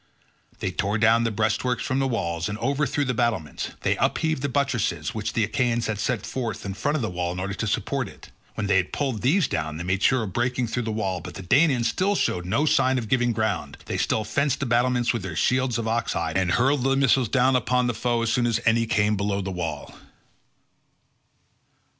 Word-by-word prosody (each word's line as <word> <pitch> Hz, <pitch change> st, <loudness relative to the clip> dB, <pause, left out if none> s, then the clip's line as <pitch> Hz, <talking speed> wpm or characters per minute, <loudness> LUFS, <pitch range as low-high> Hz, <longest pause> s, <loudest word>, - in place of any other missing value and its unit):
They -, -, -1 dB
tore 100 Hz, +2 st, -1 dB
down 115 Hz, +1 st, +4 dB
the -, -, +2 dB
breastworks 110 Hz, +3 st, 0 dB
from 130 Hz, -, -1 dB
the 135 Hz, -, +1 dB
walls, 85 Hz, -7 st, -2 dB
and 105 Hz, -, -4 dB
overthrew 140 Hz, +3 st, 0 dB
the 130 Hz, -, 0 dB
battlements; 115 Hz, -, -1 dB
they -, -, +1 dB
upheaved 160 Hz, -4 st, 0 dB
the 140 Hz, -, -1 dB
buttresses, 120 Hz, -, -1 dB
which 110 Hz, -2 st, -3 dB
the 115 Hz, -, +1 dB
Achaeans 115 Hz, +2 st, 0 dB
had 110 Hz, -2 st, -2 dB
set 120 Hz, +1 st, -1 dB
in 115 Hz, -6 st, -3 dB
front 145 Hz, +9 st, -1 dB
of 145 Hz, -, -1 dB
the 110 Hz, -, -1 dB
wall 90 Hz, 0 st, -2 dB
in 90 Hz, -, -5 dB
order 95 Hz, +1 st, -3 dB
to -, -, -3 dB
support -, -, -1 dB
it; -, -, -14 dB, 0.2 s
when 105 Hz, -, -2 dB
they 100 Hz, -1 st, +3 dB
had 90 Hz, -1 st, -1 dB
pulled 130 Hz, -7 st, -2 dB
these 155 Hz, -, +3 dB
down 80 Hz, 0 st, -3 dB
they 85 Hz, -, -5 dB
made 95 Hz, +2 st, -1 dB
sure 130 Hz, +1 st, +3 dB
of 95 Hz, -4 st, -6 dB
breaking 125 Hz, +1 st, 0 dB
through 120 Hz, +2 st, -2 dB
the -, -, -1 dB
wall, 95 Hz, -5 st, -2 dB
but -, -, -9 dB
the 95 Hz, -, -7 dB
Danaans 130 Hz, -, +3 dB
still 200 Hz, +2 st, +1 dB
showed 90 Hz, -, -1 dB
no 115 Hz, +11 st, +1 dB
sign 130 Hz, -3 st, +3 dB
of 115 Hz, -4 st, -4 dB
giving 120 Hz, -1 st, +2 dB
ground; 110 Hz, -3 st, -2 dB
they -, -, -3 dB
still 110 Hz, -, +1 dB
fenced 140 Hz, +5 st, 0 dB
the 140 Hz, -, -1 dB
battlements 120 Hz, 0 st, +2 dB
with 115 Hz, -, -2 dB
their 95 Hz, -3 st, -6 dB
shields 130 Hz, -, +1 dB
of 115 Hz, -1 st, -3 dB
ox 115 Hz, +1 st, 0 dB
hide, -, -, -2 dB
and 90 Hz, -2 st, +1 dB
hurled 135 Hz, +2 st, +2 dB
their 135 Hz, 0 st, +2 dB
missiles 135 Hz, -3 st, +3 dB
down 130 Hz, +1 st, +3 dB
upon 125 Hz, 0 st, +2 dB
the 120 Hz, -, 0 dB
foe 120 Hz, 0 st, 0 dB
as 115 Hz, -, 0 dB
soon 120 Hz, -1 st, +2 dB
as 115 Hz, -1 st, +1 dB
any 115 Hz, 0 st, +3 dB
came 105 Hz, -1 st, +2 dB
below 100 Hz, 0 st, -1 dB
the 95 Hz, 0 st, -3 dB
wall. 90 Hz, -3 st, -5 dB
115 Hz, 225 wpm, -24 LUFS, 100-130 Hz, 0.2 s, down